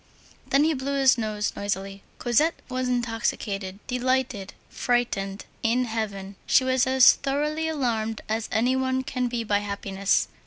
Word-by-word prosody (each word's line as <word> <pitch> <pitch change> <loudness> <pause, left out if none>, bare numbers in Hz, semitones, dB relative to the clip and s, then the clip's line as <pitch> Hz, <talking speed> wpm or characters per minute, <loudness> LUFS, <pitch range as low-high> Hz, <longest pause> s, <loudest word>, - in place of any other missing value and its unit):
Then 275 +2 +3
he 320 +1 +3
blew 275 0 -2
his 265 -2 +6
nose 215 -3 -2
noisily. 195 -1 -3 0.2
Cosette 295 +7 +2
was 255 0 -1
intoxicated, 225 -5 -2
delighted, 250 -5 -1
frightened, 205 -5 -1 0.2
in 240 +2 +2
heaven. 200 -4 -4
She - - +5
was 260 0 +2
as 260 -1 +7
thoroughly 300 +3 -1
alarmed 230 -8 -1
as 220 +1 -2
any 245 +3 +2
one 260 0 0
can 250 -1 -2
be 240 -1 -2
by 205 -2 +1
happiness. 200 -1 0
240 Hz, 145 wpm, -25 LUFS, 205-260 Hz, 0.2 s, as